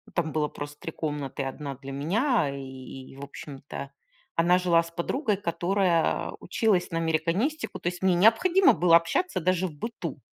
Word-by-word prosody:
там 160 -3 0
было 150 -1 0
просто 145 0 -8
3 165 - -6
комнаты, 145 -3 -4
и 135 - -2
одна 140 +1 -5
для 135 +1 -9
меня, 175 - +1
и, 130 -1 -8
в 140 - -8
общем-то, 140 0 -8 0.4
она 175 +2 +4
жила 175 -2 +3
с 165 - -10
подругой, 210 - -1
которая 175 -1 +1
училась 185 -1 +1
на 165 - -1
американистику. 165 - -1
То - - -4
есть, 180 0 -8
мне 185 -2 +3
необходимо 340 - +5
было 170 +1 +5
общаться 175 - +1
даже 185 +2 +1
в 155 - -9
быту. 225 +11 -6
170 Hz, 170 wpm, -27 LUFS, 145-190 Hz, 0.4 s, необходимо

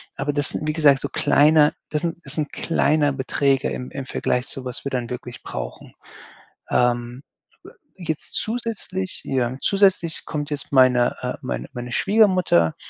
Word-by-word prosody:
Aber 145 +2 -1
das 145 0 0
sind, - - -4
wie 155 - +1
gesagt, 145 -4 +4
so 140 - -3
kleine 150 +2 +4 0.2
das 150 +1 -2
sind 170 -1 -2
das - - -8
sind 150 -2 -3
kleine 155 -3 +2
Beträge 135 0 +1
im 125 - -5
im 135 -1 -5
Vergleich 125 -1 -1
zu 135 - -5
was 125 +1 -4
wir 140 - -2
dann 125 -2 -2
wirklich 125 -1 -7
brauchen. - - -7 0.8
Ähm, 120 +1 +1 0.8
jetzt 160 -4 -5
zusätzlich 215 -5 -3
ja, 130 -2 0
zusätzlich 190 -5 +2
kommt 145 -1 -4
jetzt 145 -1 -4
meine 125 -2 +5
äh, - - -2
meine - - -4
meine 125 0 -6
Schwiegermutter 185 - +3
145 Hz, 160 wpm, -22 LUFS, 125-165 Hz, 0.8 s, meine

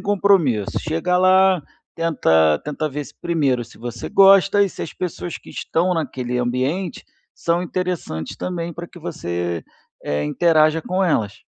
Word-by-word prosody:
compromisso. 190 - +2
Chega 165 +3 0
lá, 185 -1 +5 0.3
tenta 80 - +2
tenta 150 +1 -2
ver 145 0 -5
se, - - -14
primeiro, 140 -8 0
se 115 - -17
você 120 -1 -6
gosta, 195 +1 +6
e 200 - +2
se - - -11
as 160 - -6
pessoas 175 -1 -5
que - - -15
estão 180 +2 0
naquele 130 -5 -2
ambiente 130 +9 -2 0.3
são 170 +1 0
interessantes, 180 - -4
também, 170 -2 -4
para 170 +2 -7
que 175 - -14
você, 85 - -4 0.4
eh, 75 0 -1
interaja 155 - +3
com 185 +1 -1
elas. 105 - -1
165 Hz, 150 wpm, -21 LUFS, 125-180 Hz, 0.4 s, gosta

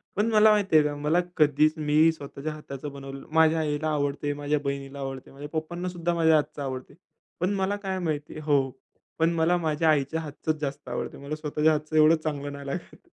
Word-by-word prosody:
पण 210 +3 +2
मला 215 0 +6
माहिती 205 -5 +2
आहे 150 - +5
का, 145 0 -1
मला 150 +4 +1 0.2
कधीच 150 0 +4
मी 155 +2 +4
स्वतःच्या 150 0 -6
हाताचं 145 -1 -7
बनवलं 135 0 -8
माझ्या 160 0 +5
आईला 150 0 -1
आवडतं. 145 0 -1
माझ्या 145 0 0
बहिणीला 140 0 -4
आवडतं. 135 -1 -6
माझ्या 145 +2 -8
पप्पांनासुद्धा 175 +2 -2
माझ्या 160 -1 +4
हातचं 150 -1 -1
आवडतं. 130 +1 -5 0.5
पण 185 +3 +1
मला 195 +1 0
काय 190 -1 -1
माहिती 155 -2 -3
हो. 145 -2 +3 0.6
पण 165 +1 +4
मला 165 +2 +2
माझ्या 160 -1 +1
आईच्या 155 +2 +1
हातचंच 155 0 -3
जास्त 145 0 -4
आवडतंय. - - -4
मला 145 +2 -4
स्वतःच्या 155 0 +1
हातचं 155 +1 -3
एवढं 155 +2 +7
चांगलं 145 -2 -4
नाही 140 0 -8
लागत. 170 +5 -5
155 Hz, 185 wpm, -26 LUFS, 145-160 Hz, 0.6 s, एवढं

